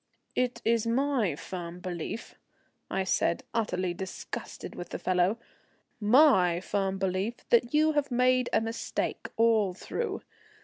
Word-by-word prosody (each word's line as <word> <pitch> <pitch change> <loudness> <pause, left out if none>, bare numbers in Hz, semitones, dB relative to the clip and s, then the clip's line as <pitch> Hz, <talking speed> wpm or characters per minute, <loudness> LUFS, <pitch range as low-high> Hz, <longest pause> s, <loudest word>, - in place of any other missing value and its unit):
"It 250 0 -1
is 230 0 +2
my 240 - +1
firm 175 +2 -7
belief," 180 +5 -5 0.6
I 190 - 0
said, 180 -2 +1
utterly 185 -5 0
disgusted 190 +1 -7
with 175 - -7
the - - -4
fellow, 185 +4 +1 0.6
"my 210 - +5
firm 195 +1 -1
belief 190 +4 -2
that 240 0 +4
you 310 +1 +5
have 290 -2 0
made 250 0 +3
a - - +3
mistake 225 +1 -3
all 220 -5 +3
through. 440 - -4
215 Hz, 130 wpm, -29 LUFS, 185-245 Hz, 0.6 s, my